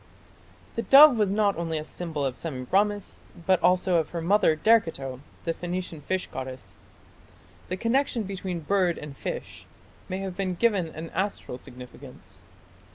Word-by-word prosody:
The - - +1
dove 280 +2 +9
was 205 -3 +2
not 205 -1 +2
only 165 -1 -2
a 155 - -3
symbol 155 -3 -4
of 130 -2 -2
Semiramis, 190 +9 -1 0.3
but 185 -1 +3
also 180 0 +3
of 160 -2 0
her 170 - -4
mother 170 -1 +3
Derceto, 155 - +2 0.3
the 165 - 0
Phoenician 175 -2 -5
fish 185 +4 -2
goddess. 130 -1 -8 0.9
The 185 - -2
connection 235 +2 +1
between 185 -3 -4
bird 180 +1 +1
and 150 -2 -8
fish - - -6 0.4
may 185 - -2
have 190 -2 -5
been 185 -1 -2
given 200 -4 +2
an 160 +1 -8
astral 190 -9 -3
significance. 125 0 -13
180 Hz, 150 wpm, -26 LUFS, 155-200 Hz, 0.9 s, dove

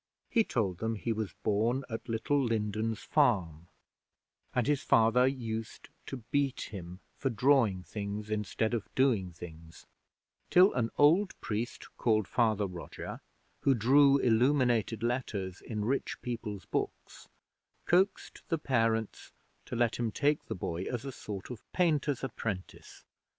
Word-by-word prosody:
He 230 - +4
told 100 - -1
them 110 0 -1
he 115 +2 -2
was 110 -2 -4
born 115 +6 +1
at 115 +1 -6
Little 125 +5 +1
Lindens 110 -1 -1
Farm, 90 - +1 0.8
and 125 - +1
his 145 -1 +1
father 115 +3 +4
used 115 -4 -4 0.2
to 125 -4 -6
beat 140 -2 +1
him 90 -2 -8 0.2
for 135 - 0
drawing 115 -6 +3
things 105 +2 -5
instead 110 +2 -1
of 115 -3 -2
doing 115 -9 +2
things, 80 -1 -11 0.6
till 185 +3 +6
an 115 -2 0
old 175 +7 +4
priest 115 +3 -4
called 110 -4 +2
Father 110 -4 +2
Roger, 90 -3 -7 0.4
who 135 - +3
drew 140 +5 +5
illuminated 120 -3 +2
letters 110 -7 -2
in 105 -3 -4
rich 135 +4 -1
people's 110 -5 -5
books, - - -4 0.6
coaxed 190 +3 +1
the 165 - +1
parents 115 -6 0 0.4
to - - -4
let 120 -1 +1
him 115 -2 -1
take 145 +5 +1
the - - -4
boy 85 -1 -3
as 125 +1 -4
a 135 - -4
sort 105 -3 -7
of 120 - -7
painter's 150 -7 +1
apprentice. 110 -7 -6
115 Hz, 140 wpm, -31 LUFS, 105-130 Hz, 0.8 s, till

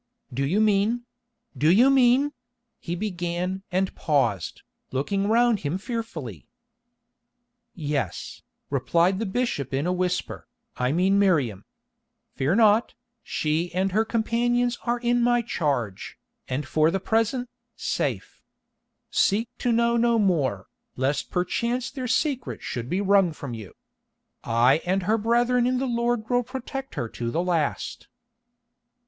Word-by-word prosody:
"Do 135 +3 -1
you 185 +8 +1
mean—do 225 - -1
you 240 +10 +6
mean—?" 270 +2 +4 0.5
he 175 - -4
began 180 -1 -3
and 185 +1 0
paused, 120 - 0 0.3
looking 195 +10 -1
round 230 0 +3
him 155 +3 -2
fearfully. 190 - -6 1.3
"Yes," 145 - -3 0.3
replied 175 +3 +2
the 225 - -2
bishop 190 - -1
in 140 +3 -1
a 180 - +1
whisper, 180 0 -2 0.3
"I 125 +1 0
mean 190 +5 +3
Miriam. 140 - +1 0.7
Fear 140 +7 +1
not, 220 0 +4 0.3
she 160 0 -1
and 190 +1 +1
her 215 +4 +3
companions 240 +2 0
are 240 +1 +2
in 240 0 +1
my 240 0 +3
charge, 135 - -2 0.3
and 130 +2 -3
for 155 +2 +3
the 195 - -1
present, 225 +5 0 0.3
safe. - - -3 0.7
Seek 220 +4 +2
to 245 - +1
know 235 0 +3
no 235 0 +3
more, 145 - +1 0.3
lest 135 +3 -1
perchance 235 +8 -1
their 255 -3 -4
secret 260 +1 -1
should 120 0 -4
be 185 +3 0
wrung 195 -4 +3
from 140 -4 -7
you. 110 -5 -9 0.7
I 125 +6 +3
and 185 +1 0
her 220 +4 +1
brethren 240 +2 +2
in 255 0 +1
the 265 - -1
Lord 235 -2 0
will 245 0 +2
protect 265 +2 -6
her 120 - -2
to 115 +1 -4
the 165 +8 -1
last." 165 -5 -2
195 Hz, 135 wpm, -25 LUFS, 155-235 Hz, 1.3 s, you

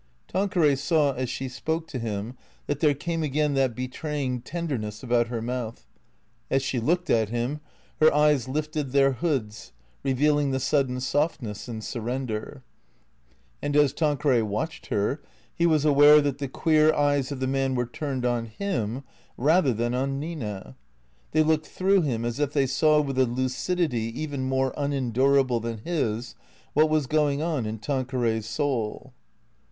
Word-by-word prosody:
Tanqueray 180 -6 +2
saw 145 0 +2
as 130 -1 -3
she 135 - -3
spoke 160 +6 -3
to 130 - -4
him 110 +1 -4 0.3
that 145 -1 -2
there 150 -2 +3
came 165 +3 -3
again 150 0 0
that 135 -4 +1
betraying 130 0 -3
tenderness 130 -9 -4
about 120 -1 +2
her 115 -1 -4
mouth; 120 -2 -4 0.6
as 135 0 +1
she 135 -2 -1
looked 175 +9 0
at 110 -2 +2
him, 120 +6 -2 0.4
her 155 - +6
eyes 150 -3 +3
lifted 150 -1 -3
their 135 -1 +5
hoods, 130 -7 -3 0.3
revealing 145 +2 +2
the 130 0 0
sudden 130 -1 +1
softness 125 -5 -2
and 110 -2 -6
sur 120 - -4
render. 125 +2 -4 1.0
And 145 0 -2
as 145 -2 +4
Tanqueray 145 -5 +2
watched 110 +10 -3
her 105 +9 -1 0.3
he 170 - +2
was 155 -2 +2
aware 145 0 +7
that 145 -2 -1
the 140 - -2
queer 155 +3 +3
eyes 145 -2 +1
of 140 - -4
the 130 - -1
man 135 0 0
were 125 0 0
turned 130 0 -4
on 120 -1 0
him, 120 - -3 0.3
rather 150 +2 +3
than 120 +1 -1
on 135 +2 -1
Nina. 105 - -6 0.6
They 155 - +4
looked 155 0 +1
through 190 +1 +2
him, 120 -7 -1
as 120 +3 -3
if 145 -1 0
they 140 -2 +3
saw 150 +4 +3
with 135 -2 -2
a 130 - +4
lucidity 130 0 -1
even 145 -4 -3
more 130 0 +1
unendurable 135 -2 +2
than 115 0 -4
his, 120 -4 -2 0.4
what 155 +2 +4
was 155 -2 +2
going 150 +1 +1
on 155 -9 -1
in 110 +1 -4
Tanqueray's 120 -3 -1
soul. 125 -1 -2
135 Hz, 160 wpm, -26 LUFS, 120-150 Hz, 1.0 s, aware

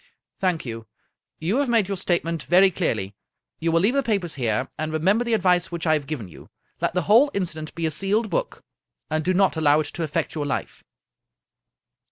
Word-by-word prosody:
" - - -59
Thank 180 -6 0
you. 115 -2 -7 0.5
You 180 +9 -1
have 280 -2 +1
made 225 -5 +3
your 200 - -2
statement 170 -3 -1
very 185 +5 +5
clearly. 110 - -2 0.5
You 165 0 0
will 165 0 +3
leave 210 +6 +3
the 275 - +2
papers 200 - -1
here, 115 -6 -1
and 155 0 -3
remember 190 +9 +2
the 235 -2 +1
advice 180 -4 +2
which 170 0 -4
I 155 - +4
have 150 -3 -1
given 140 -10 -4
you 85 - -14 0.3
Let - - 0
the 180 - +1
whole 235 - +5
inci 185 -5 -1
dent 155 0 -8
be 165 0 -2
a 160 - 0
sealed 195 +7 -1
book, - - -2 0.5
and 155 0 0
do 185 +3 +1
not 190 -3 +3
allow 150 -1 +4
it - - -4
to - - -5
affect 165 0 -2
your 150 -2 -3
life." - - -4
170 Hz, 215 wpm, -24 LUFS, 155-195 Hz, 0.5 s, very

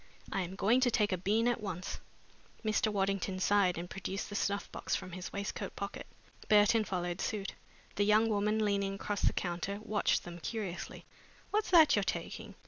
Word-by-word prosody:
I 195 - 0
am 180 +1 -5
going 225 +6 +3
to 255 - +4
take 210 -3 +2
a - - +2
bean 215 +6 +2
at 240 -2 +1
once." 190 -3 -4 0.7
Mr. 215 0 +2
Waddington 195 -1 0
sighed 190 -2 +3
and 170 +1 -4
produced 190 +1 -4
the - - -5
snuff 200 0 0
box - - -2
from 185 - -5
his 185 +1 -6
waistcoat 200 0 -4
pocket. 200 0 -5 0.4
Burton 210 +1 +5
followed 175 -2 -2
suit. 200 -3 -2 0.4
The 205 - +3
young 210 +2 +4
woman, 210 0 +1
leaning 200 -1 0
across 205 +1 -3
the - - +4
counter, 180 +3 -3
watched 215 -2 +1
them 175 0 -8
curiously. 195 -1 -5 0.5
"What's 425 +1 +1
that 320 -5 +7
you're 205 - +3
taking?" 195 +4 -4
200 Hz, 180 wpm, -33 LUFS, 185-215 Hz, 0.7 s, that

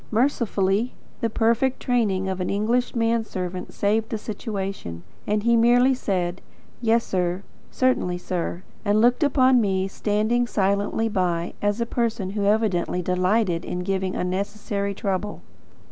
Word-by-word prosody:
Mercifully, 225 -3 +1 0.2
the 230 - 0
perfect 235 +4 +1
training 210 -7 +1
of 190 -1 -2
an 180 - -1
English 230 +6 0
man 230 0 +2
servant 180 -3 -5
saved 215 +2 0
the 220 - -2
situation, 195 - -5 0.2
and 210 0 +1
he 235 +1 +4
merely 245 +3 +5
said: 185 -7 -2 0.4
"Yessir; 195 -6 +1 0.3
certainly 255 -9 +1
sir," 175 0 -3 0.2
and 210 0 +2
looked 245 +6 +4
upon, 260 -4 +4
me, 190 -2 +1
standing 215 +5 0
silently 200 +2 +1
by, 175 -5 -1
as 205 +2 0
a 235 - +1
person 230 -5 -1
who 205 0 -1
evidently 200 -4 +1
delighted 180 0 +1
in 180 - -4
giving 190 0 -1
unnecessary 200 +2 -2
trouble. 200 +1 -3
205 Hz, 135 wpm, -24 LUFS, 185-230 Hz, 0.4 s, merely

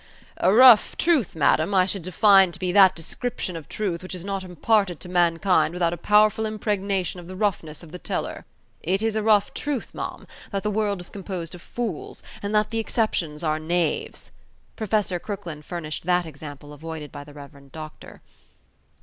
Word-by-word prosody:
"A 185 - +3
rough 240 0 +7
truth, 315 - +2
madam, 160 +5 +2
I 185 -1 +5
should 195 0 -2
define 190 +1 +5
to - - -7
be 180 0 -2
that 190 -1 +6
description 180 +2 -4
of 160 -3 -8
truth 190 -6 -2
which 185 0 -7
is 180 0 -6
not 195 -1 -3
imparted 185 0 +1
to 180 - -8
mankind 175 0 +2
without 170 -1 +1
a - - -2
powerful 210 +4 +3
impregnation 200 -4 -2
of 170 - -11
the 185 - -8
roughness 180 -6 -2
of 160 - -13
the 180 - -8
teller." - - -4 0.4
"It 190 +5 0
is 225 -1 0
a 215 - +1
rough 210 -2 +3
truth, 285 -5 -3
ma'am, - - -6 0.3
that 195 -2 -2
the 210 - 0
world 205 -3 -1
is 175 - -8
composed 185 -4 -6
of 180 - -10
fools, 225 -8 -5 0.2
and 205 +1 -2
that 210 +1 +2
the 225 - -1
exceptions 175 -9 -1
are 155 -1 0
knaves," 165 0 -2 0.4
Professor 210 -5 0
Crooklyn 180 -6 -6
furnished 160 0 -6
that 180 -1 +2
example 145 -1 -10
avoided 155 0 -7
by 145 - -8
the 145 0 -15
Rev. 140 -1 -13
Doctor. 155 0 -10
185 Hz, 185 wpm, -24 LUFS, 165-210 Hz, 0.4 s, rough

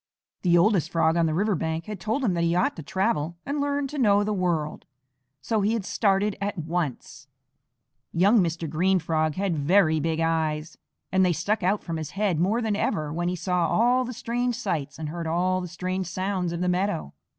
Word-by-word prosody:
The 175 -2 +4
oldest 175 -3 +3
Frog 165 -1 +2
on 170 -1 +3
the 155 - 0
river 205 +4 +1
bank 160 -1 -2
had 210 -3 -6
told 225 +9 -1
him 205 -7 +2
that 170 -1 0
he 170 0 +2
ought 180 - +1
to - - -5
travel 175 -1 -1
and 285 +1 -2
learn 285 0 0
to 295 - -5
know 205 -4 +4
the 210 +1 -1
world, 170 -6 -1 0.6
so 220 -2 0
he 210 +3 +2
had 225 -5 -2
started 200 -1 +1
at 200 0 -2
once. 150 -4 -4 0.8
Young 200 +7 +4
Mr. 170 -2 -1
Green 180 +5 +2
Frog 155 -2 0
had 190 -3 0
very 160 +1 +3
big 160 +1 -1
eyes, 160 -1 -1 0.3
and 190 0 +3
they 180 -1 +3
stuck 200 +7 -1
out 190 +3 +1
from 165 -2 -4
his 155 -2 -5
head 195 -6 +1
more 215 +7 +1
than 215 -2 0
ever 155 -6 -1
when 175 +1 -1
he 180 - 0
saw 180 -1 0
all 245 +6 +3
the 250 - -5
strange 245 0 -2
sights 145 -8 -3
and 155 -2 -5
heard 165 +1 -4
all 185 +3 +1
the 180 - -5
strange 185 +1 -3
sounds 185 0 -2
of 170 0 -4
the 180 - 0
meadow. 180 - -1
180 Hz, 210 wpm, -25 LUFS, 165-205 Hz, 0.8 s, The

